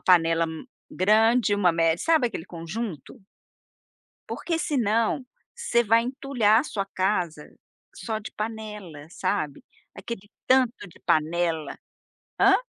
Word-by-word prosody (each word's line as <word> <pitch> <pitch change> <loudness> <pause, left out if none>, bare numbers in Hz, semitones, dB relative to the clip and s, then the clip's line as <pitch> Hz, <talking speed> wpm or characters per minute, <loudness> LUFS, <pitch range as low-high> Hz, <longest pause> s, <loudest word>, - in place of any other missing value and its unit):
panela 165 -2 +4
m 160 +7 -7 0.2
grande, 220 +3 +3
uma 185 -4 +3
mé 165 -1 +2
sabe 315 - +3
aquele 210 -8 -5
conjunto? 175 - -6 1.1
Porque 330 -2 -2
senão, 235 -4 +1 0.3
você 475 - +1
vai 230 +1 +4
entulhar 245 -4 +2
a - - -5
sua 200 -9 -3
casa 180 -6 -2 0.4
só 220 - -3
de 215 - -8
panela, 210 -8 -6
sabe? 150 -4 -2 0.3
Aquele 205 -3 -7 0.2
tanto 255 -5 +2
de 170 - -18
panela 160 0 0 0.6
Hã? 390 - +7
210 Hz, 120 wpm, -25 LUFS, 170-235 Hz, 1.1 s, Hã